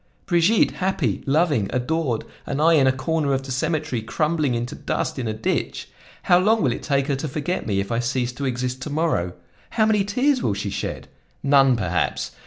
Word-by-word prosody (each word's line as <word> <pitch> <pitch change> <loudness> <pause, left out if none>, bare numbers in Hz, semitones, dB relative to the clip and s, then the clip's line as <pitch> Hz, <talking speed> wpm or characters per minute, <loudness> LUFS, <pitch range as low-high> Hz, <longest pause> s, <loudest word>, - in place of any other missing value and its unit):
Brigitte 175 +5 +3
happy, 175 - 0
loving, 145 - +2
adored, 125 -2 -1 0.2
and 140 - -2
I 165 +2 +5
in 140 -4 +5
a - - +5
corner 140 +2 -1
of 135 0 -1
the 135 - -7
cemetery, 150 -2 -1
crumbling 150 +3 0
into 120 +1 -3
dust - - -3
in 120 - -2
a - - 0
ditch! 110 - -2 0.3
How 175 - +5
long 215 +2 +3
will 130 - +2
it - - -6
take 140 -3 +1
her 140 - 0
to 155 - -3
forget 155 +4 -3
me 100 -2 0
if 100 +2 -3
I 115 - +1
cease 125 0 -1
to 140 +3 -5
exist 125 0 -2
to 150 - -5
morrow? 145 - 0 0.4
How 220 -2 +2
many 215 -2 +3
tears 255 +6 +1
will 100 - 0
she 100 0 -3
shed? - - -4 0.4
None, 135 -2 +5
perhaps! 90 -5 -1
140 Hz, 200 wpm, -23 LUFS, 125-165 Hz, 0.4 s, I